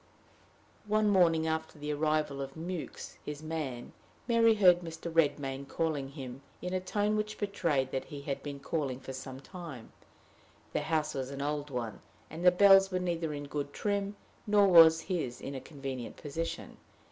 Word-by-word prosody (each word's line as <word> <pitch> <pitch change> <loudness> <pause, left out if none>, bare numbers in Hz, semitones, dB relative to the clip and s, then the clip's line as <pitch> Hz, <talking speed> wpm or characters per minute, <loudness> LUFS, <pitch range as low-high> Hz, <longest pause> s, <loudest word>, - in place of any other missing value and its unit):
One 215 0 +3
morning, 170 -5 +4
after 160 0 -2
the 150 0 -3
arrival 150 -2 0
of 135 0 -6
Mewks, 170 +1 -6
his 150 +1 -6
man, 150 -7 -4 0.3
Mary 230 -2 +5
heard 180 -4 +6
Mr. 165 -1 -7
Redmain 140 -4 +1
calling 150 -4 -1
him 135 -2 -8 0.2
in 180 0 -4
a 185 - +1
tone 205 +3 0
which 215 0 -2
betrayed 160 -10 0
that 130 - -2
he 145 -1 -8
had 140 -1 -3
been 145 -1 -6
calling 140 -3 -2
for 135 - -8
some 130 0 -7
time: 155 - -9 0.8
the - - +1
house 155 -1 0
was 130 -1 -3
an 140 0 -4
old 145 0 -2
one, 115 -6 -4 0.3
and 160 +3 -6
the 180 - +9
bells 195 +1 +7
were 185 - -1
neither 170 -3 -1
in 145 -1 -5
good 145 0 -4
trim, 200 0 -1 0.3
nor 205 -1 +5
was 165 -3 +8
his 155 -10 -3
in 140 - -6
a 135 - -5
convenient 135 -4 -6
position. 165 +3 -5
155 Hz, 170 wpm, -31 LUFS, 140-180 Hz, 0.8 s, the